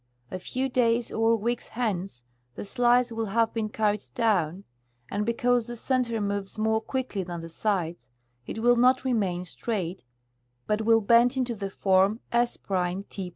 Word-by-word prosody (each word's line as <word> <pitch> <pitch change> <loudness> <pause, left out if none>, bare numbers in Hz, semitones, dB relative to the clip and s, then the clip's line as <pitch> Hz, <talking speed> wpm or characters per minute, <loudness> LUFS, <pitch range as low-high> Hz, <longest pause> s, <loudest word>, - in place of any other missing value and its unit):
A 185 - -4
few 260 +7 -2
days 240 -2 +1
or 225 +1 +3
weeks 235 +2 -2
hence 195 - -3 0.3
the - - -6
slice 245 +3 +3
will 225 -1 -2
have 225 +3 +1
been 220 -2 -2
carried 210 -1 0
down, 195 -6 +1 0.5
and 210 +2 -1
because 240 0 +1
the 240 - -6
center 240 -1 0
moves 200 0 -3
more 220 0 +1
quickly 255 -4 -3
than 175 -2 -5
the 165 - -8
sides 170 - -2 0.4
it 220 - -5
will 245 0 +5
not 255 +2 +4
remain 195 -8 0
straight, 185 -1 -4 0.6
but 210 +1 0
will 225 0 +4
bend 235 +4 +4
into 250 -2 0
the 200 -3 -4
form 195 +3 +2
S^ 240 0 +2 0.5
T' 190 -3 -5
220 Hz, 160 wpm, -27 LUFS, 195-240 Hz, 0.6 s, will